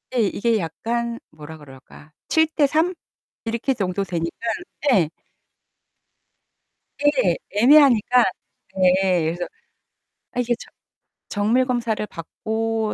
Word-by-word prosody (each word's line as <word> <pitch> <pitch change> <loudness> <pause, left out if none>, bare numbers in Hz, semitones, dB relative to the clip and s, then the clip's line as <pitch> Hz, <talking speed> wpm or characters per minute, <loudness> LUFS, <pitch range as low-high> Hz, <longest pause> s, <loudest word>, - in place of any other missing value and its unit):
예 - - +2
이게 230 +1 0
약간 235 +7 -3
뭐라 155 +1 -11
그럴까? 145 +1 -15 0.2
7 320 0 +4
대 310 -1 +2
3 320 +6 +1 0.5
이렇게 235 +4 -1
정도 195 -4 -2
되니깐 170 +5 -4 0.4
예. 180 -10 +3 1.9
네 270 - +2
애매하니까 250 0 +5 0.5
네 185 -1 +3
그래서 170 +3 -2 0.9
아 245 - -1
이게 245 0 +1
저 - - -12 0.6
정밀 225 +6 +2
검사를 235 -4 -1
받고 220 +6 -3
220 Hz, 190 characters per minute, -22 LUFS, 180-245 Hz, 1.9 s, 애매하니까